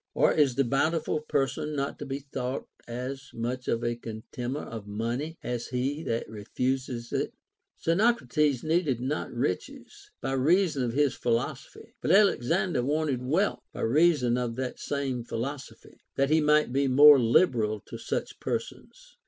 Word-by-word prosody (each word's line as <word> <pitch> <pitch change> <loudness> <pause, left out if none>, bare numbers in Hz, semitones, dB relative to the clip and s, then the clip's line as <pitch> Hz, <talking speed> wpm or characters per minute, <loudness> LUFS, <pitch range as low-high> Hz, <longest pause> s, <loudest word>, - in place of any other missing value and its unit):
Or - - +4
is 140 -5 +3
the 140 - +3
bountiful 155 +5 0
person 150 0 -1
not 140 0 -3
to 145 - -6
be 135 0 -3
thought 135 -2 -5 0.2
as 130 +3 -5
much 125 +2 -3
a 115 - +2 0.2
contemner 120 +4 -6
of 110 -3 -8
money 120 +10 -3
as 120 -1 -3
he 135 +4 -2
that 115 0 -2
refuses 120 +3 -3
it - - -1 0.2
] - - -25
Xeno 215 +9 +4
crates 150 -5 0
needed 155 -6 +1
not 135 +5 -3
riches, 90 -7 -4
by 135 - -3
reason 155 +3 +2
of 120 -2 -1
his 145 -1 +2
philosophy; 120 0 -3
but - - -2
Alexander 185 - +3
wanted 145 -1 0
wealth, 160 +11 +1
by - - -6
reason 130 -2 +3
of 120 -2 -2
the 130 0 -3
same 135 -4 -3
philoso 130 +4 -5
phy, - - -19 0.2
that 135 +1 +1
he 160 0 +5
might 150 -3 +3
be 140 +1 +2
more 145 +2 +8
liberal 115 - +3
to - - -9
such - - -4
persons. - - -6
135 Hz, 160 wpm, -28 LUFS, 120-150 Hz, 0.2 s, more